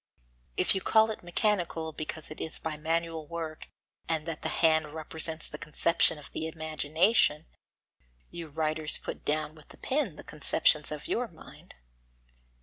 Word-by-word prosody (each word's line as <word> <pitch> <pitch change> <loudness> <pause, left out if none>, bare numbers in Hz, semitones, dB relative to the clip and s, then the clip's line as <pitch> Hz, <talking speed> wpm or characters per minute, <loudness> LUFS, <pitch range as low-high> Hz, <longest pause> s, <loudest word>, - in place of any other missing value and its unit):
If - - +4
you 190 - 0
call 220 +2 +4
it 215 - -7
mechanical 175 -3 -1
because 155 0 -6
it 155 - -8
is 160 - -3
by 160 -1 -4
manual 165 0 -2
work 160 -1 -6 0.4
and 160 -2 -1
that 165 -2 -5
the - - -2
hand 160 -2 +2
represents 160 0 -3
the 150 - -8
conception 165 +1 +1
of 150 - -12
the 160 - -3
imagination, 160 +2 +1 0.9
you 170 -1 -7
writers 155 0 +6
put - - -7
down 155 0 -1
with 155 -2 -17
the - - -15
pen 260 - -1
the - - -11
conceptions 150 0 +1
of 150 -1 -6
your 245 +1 -1
mind. 165 -6 -16
160 Hz, 155 wpm, -29 LUFS, 155-170 Hz, 0.9 s, writers